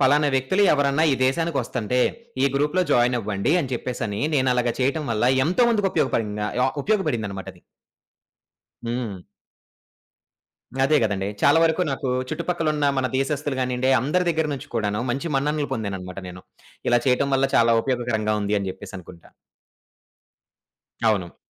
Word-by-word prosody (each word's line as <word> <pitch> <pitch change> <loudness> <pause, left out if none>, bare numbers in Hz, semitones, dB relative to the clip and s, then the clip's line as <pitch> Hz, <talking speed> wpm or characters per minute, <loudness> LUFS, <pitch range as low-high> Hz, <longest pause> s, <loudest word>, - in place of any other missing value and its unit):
పలానా 145 +2 +4
వ్యక్తులు 135 +10 +1
ఎవరన్నా 140 +1 +2
ఈ - - +3
దేశానికొస్తంటే 130 -6 -1 0.4
ఈ - - +5
గ్రూప్‌లో 150 +6 +1
జాయిన్ 120 +1 +3
అవ్వండి 105 +3 -1
అని 135 -5 -4
చెప్పేసని 115 -4 -4
నేను 130 -2 +2
అలాగా 120 -1 +1
చేయటం 140 +4 0
వల్ల 110 +1 0 0.2
ఎంతో 185 - +3
ముందుకు 205 -4 +2
ఉపయోగపడింగ 105 -2 0 0.2
ఆహ్, 130 - +1
ఉపయోగపడిందనమాట 120 - -1
అది. 90 - -22 1.2
హ్మ్. 115 -6 -4 1.6
అదే 150 +2 +3
కదండి. 100 -3 -1
చాలా 145 +3 +5
వరకు 165 +2 +2
నాకు 135 0 -3 0.2
చుట్టుపక్కలున్న 155 -2 -1
మన 130 -1 +1
దేశస్తులు 140 0 -1
కానియండి 125 0 0
అందరి 180 +8 0
దగ్గర 160 -2 0
నుంచి 135 - -7
కూడాను 105 -1 -1
మంచి 135 +7 -3
మన్ననలు 145 +1 0
పొందాననమాట 95 -5 -5
నేను. 90 +1 -10 0.5
ఇలా 120 0 +4
చేయటం 130 +2 +2
వల్ల 135 0 +2
చాలా 115 0 +5
ఉపయోగకరంగా 120 -5 -1
ఉంది 100 +1 0
అని 95 -1 -3
చెప్పేసనుకుంటా. 90 -3 -11 1.8
అవును. 95 -6 0
130 Hz, 135 wpm, -23 LUFS, 110-150 Hz, 1.8 s, ఈ